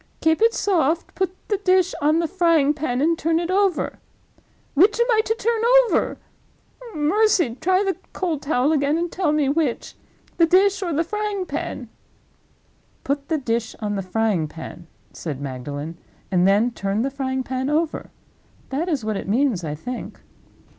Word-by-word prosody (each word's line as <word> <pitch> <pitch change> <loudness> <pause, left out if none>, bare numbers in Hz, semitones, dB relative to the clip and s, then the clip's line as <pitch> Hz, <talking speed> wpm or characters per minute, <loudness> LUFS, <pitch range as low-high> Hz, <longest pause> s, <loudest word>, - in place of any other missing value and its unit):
'Keep 320 +4 +2
it 455 +1 +5
soft; 335 -5 +1
put 380 -1 -1 0.2
the 410 - 0
dish 370 -2 +2
on 305 +2 +3
the 335 0 +1
frying 335 -5 +3
pan, 270 -4 -2
and 330 +3 +3
turn 325 +1 +1
it 345 +1 -2
over.' 390 -3 +1 0.7
Which 405 +9 +4
am 475 - +4
I 440 -1 +4
to 445 - 0
turn 460 -1 0 0.3
over—oh, 470 -9 -5
mercy, 350 - +2
try 370 +4 +3
the 385 -3 0 0.2
cold 335 -6 -2
towel 280 0 +1
again, 290 0 +2
and 340 0 -2
tell 360 -5 0
me 300 -2 +1
which—the 300 +3 -2
dish 390 +3 +4
or 355 -3 -2
the 320 +2 +1
frying 420 +1 -3
pan?" 295 -5 -5 1.2
"Put 280 +1 -2
the 320 - +1
dish 230 -4 -2
on 210 -1 -2
the 195 - -1
frying 190 -3 0
pan," 160 +2 -10 0.3
said 140 - -5
Magdalen; 145 +4 -6 0.3
"and 180 0 +3
then 210 +5 +3
turn 200 0 -2
the 275 - -1
frying 265 -1 -2
pan 260 +1 -3
over. 315 +1 -1 0.6
That 310 +7 -2
is 280 -9 -1
what 215 -2 -1
it - - -6
means, 235 -5 +1
I 150 -2 -3
think." 245 +11 -7
300 Hz, 165 wpm, -22 LUFS, 235-365 Hz, 1.2 s, it